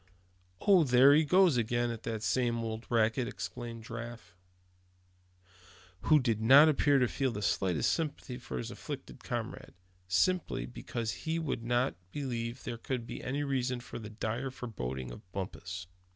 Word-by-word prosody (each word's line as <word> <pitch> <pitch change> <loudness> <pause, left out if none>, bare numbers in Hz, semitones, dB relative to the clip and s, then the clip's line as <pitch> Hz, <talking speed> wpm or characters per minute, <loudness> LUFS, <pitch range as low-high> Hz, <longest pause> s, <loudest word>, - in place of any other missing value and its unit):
"Oh! 190 -4 +6
there 130 +1 +7
he 155 +2 +5
goes 180 -2 +5
again 120 +1 +1
on 115 - -5
that 110 -1 -4
same 115 +4 +1
old 110 0 -5
racket!" 115 +1 +2
exclaimed 120 -2 -6
Giraffe; 115 -5 -8 1.7
who 155 - +6
did 115 -5 0
not 135 +7 +8
appear 145 -1 +4
to 125 -2 +3
feel 135 +3 0
the 105 -2 -4
slightest 95 -5 +1
sympathy 145 -5 -3
for 65 - -6
his - - -4
afflicted - - -8
comrade, - - -5 0.3
simply, 165 - +1
because 110 - -4
he 160 0 -3
would 155 -7 -2
not 120 +3 +1 0.2
believe 120 -3 -4
there 115 - -5
could 125 -1 -3
be - - -7
any 140 +3 -1
reason 130 -3 -1
for 120 - -8
the 105 -2 -8
dire 115 +4 -3
forebodings 65 - -5
of 90 +9 -12
Bumpus. 90 -2 -5
120 Hz, 155 wpm, -31 LUFS, 110-135 Hz, 1.7 s, not